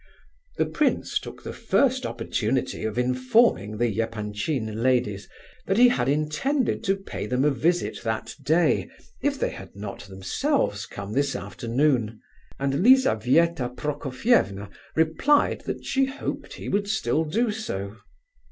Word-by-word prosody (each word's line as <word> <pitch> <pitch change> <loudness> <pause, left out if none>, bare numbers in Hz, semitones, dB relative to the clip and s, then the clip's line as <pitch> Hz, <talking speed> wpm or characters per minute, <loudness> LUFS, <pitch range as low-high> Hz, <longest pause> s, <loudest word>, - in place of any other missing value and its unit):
The - - +2
prince - - 0
took - - -10
the - - -6
first 260 -1 +1
opportunity 120 +1 -2
of 110 +1 -3
informing 125 - +2
the 115 -2 0
Epanchin 110 +1 -3
ladies 120 -6 +1 0.4
that 195 - +1
he 245 +1 +8
had 135 - 0
intended 155 - 0
to 195 - +3
pay 195 - -6
them 125 +4 +1
a 150 - +4
visit 170 +6 0
that 110 -1 -3
day, 145 - +2 0.3
if - - 0
they - - 0
had - - -11
not 100 0 -7
themselves 100 - -1
come 100 0 -7
this 140 +1 +1
afternoon, 120 -3 0 0.4
and 140 +4 0
Lizabetha 165 - +4
Prokofievna 135 - 0 0.2
replied 160 - +2
that - - -4
she 270 0 +2
hoped 270 +1 -5
he - - -8
would 200 0 0
still 160 - +1
do 220 +9 0
so. 105 - -5
135 Hz, 135 wpm, -25 LUFS, -, 0.4 s, he